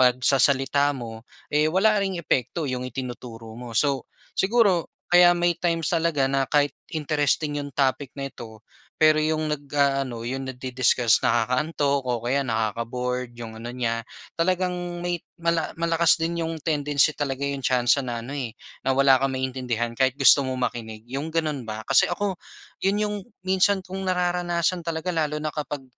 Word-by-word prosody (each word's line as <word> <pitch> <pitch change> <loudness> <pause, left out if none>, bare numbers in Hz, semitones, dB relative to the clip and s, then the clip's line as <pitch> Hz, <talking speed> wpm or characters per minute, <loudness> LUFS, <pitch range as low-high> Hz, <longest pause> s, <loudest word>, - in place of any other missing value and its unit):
pagsasalita 135 +2 +3
mo, 115 -1 -8 0.2
eh, 150 +1 +3
wala 205 +5 +3
ring 195 -2 -1
epekto 155 -1 -1
'yung 125 -2 -3
itinuturo 120 -3 -7
mo. 115 0 -7
So, 140 0 +1 0.2
siguro 200 -4 +2 0.2
kaya 175 0 +7
may 175 0 +2
times 165 -3 0
talaga 165 -5 +2
na 135 -1 0
kahit 145 -1 +2 0.2
interesting 150 -1 0
'yung 145 - -5
topic 135 0 0
na 135 -1 -5
ito, 110 -1 -11 0.3
pero 155 0 +5
'yung 155 0 0
nag-aano, 140 -5 -1
'yung 130 +2 -4
nagdi-discuss, 125 -2 +2
nakakaantok 140 +5 +1
o 120 -1 -1
kaya 135 +3 +1
nakaka-bored 125 +1 -2
'yung 115 -2 -7
ano 120 - -6
niya, 120 -2 -2 0.4
talagang 185 +1 +1 0.3
may 175 -1 -1 0.2
mala 170 -1 -1
malakas 165 0 +3
din 170 +1 -2
'yung 165 0 -2
tendency 150 -1 +2
talaga, 140 -1 -3
'yung 140 -1 -2
tsansa 125 +1 +3
na 120 -3 -4
ano, 135 - -7
eh, 125 -6 -5 0.2
na 135 0 0
wala 135 -1 +5
kang 135 -1 0
maintindihan 125 -3 -2
kahit 130 +2 +1
gusto 145 - +7
mo 130 - -2
makinig, 110 -3 -4
'yung 135 +6 -4
ganun 155 -7 -2
ba? 110 +1 -5
Kasi 135 -1 +4
ako 190 +1 -2 0.4
'yun 195 +2 +1
'yung 210 0 -2 0.3
minsan 190 0 +2
kong 190 +1 -6
nararanasan 175 -1 0
talaga 165 +2 -3
lalo 150 -2 0
na 155 - -2
kapag 145 -2 -5
140 Hz, 160 wpm, -24 LUFS, 125-165 Hz, 0.4 s, kaya